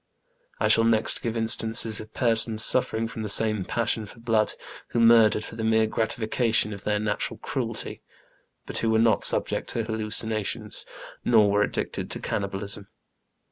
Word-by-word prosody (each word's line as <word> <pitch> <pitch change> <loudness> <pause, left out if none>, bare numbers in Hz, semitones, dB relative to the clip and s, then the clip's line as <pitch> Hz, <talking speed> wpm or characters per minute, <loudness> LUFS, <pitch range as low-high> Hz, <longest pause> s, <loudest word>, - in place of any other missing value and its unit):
I - - +1
shall 115 - +5
next 115 -1 +1
give 115 -1 -3
instances 110 -1 +2
of 110 0 -10
persons 115 -2 +1
suflfering 115 -3 +2
from 115 -1 -8
the 105 - -4
same 110 -1 +4
passion 110 +1 -2
for 115 - -13
blood, 115 -2 +1 0.3
who 120 - -2
murdered 115 -2 +5
for - - -10
the 110 - -5
mere 110 0 +2
gratification 110 0 -1
of 100 - -11
their 105 0 0
natural 105 0 -3
cruelty, - - -4 0.6
but - - -3
who 115 - 0
were 110 - +2
not 115 0 +2
subject - - +1
to 115 - -1
hallucinations, 110 -1 -2 0.4
nor 110 -4 +4
were 105 0 +2
addicted - - -3
to - - -2
can - - -3
nibalism. 100 0 -4
110 Hz, 165 wpm, -25 LUFS, 105-115 Hz, 0.6 s, shall